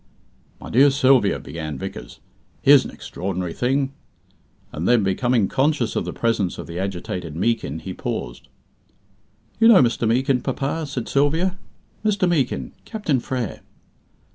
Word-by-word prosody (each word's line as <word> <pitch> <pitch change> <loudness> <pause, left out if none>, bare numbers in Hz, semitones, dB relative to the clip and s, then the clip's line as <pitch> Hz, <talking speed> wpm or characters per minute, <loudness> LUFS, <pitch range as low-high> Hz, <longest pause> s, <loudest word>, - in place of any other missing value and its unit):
"My - - -9
dear 135 +5 +6
Sylvia," 130 -6 +3
began 80 -2 -6
Vickers, 95 0 -8 0.4
"here's - - +7
an - - -5
extraordinary 90 -2 -5
thing!" 135 +2 0 0.8
and 80 +4 -3
then, 120 -3 +4
becoming 110 +3 +1
conscious 135 -4 0
of - - -1
the - - -4
presence 115 -6 -1
of - - -6
the 85 +1 -6
agitated 90 -4 -4
Meekin, 100 -5 -1
he 90 +3 -6
paused. - - -5 1.1
"You 225 - +6
know 215 - +8
Mr. 120 -1 0
Meekin, 130 +2 +2
papa?" 140 +4 -2
said 135 -4 -4
Sylvia. 160 +7 +1 0.4
"Mr. 205 -3 +2
Meekin, 150 -8 0
Captain 185 - -1
Frere." 125 -2 -4
125 Hz, 140 wpm, -22 LUFS, 95-140 Hz, 1.1 s, know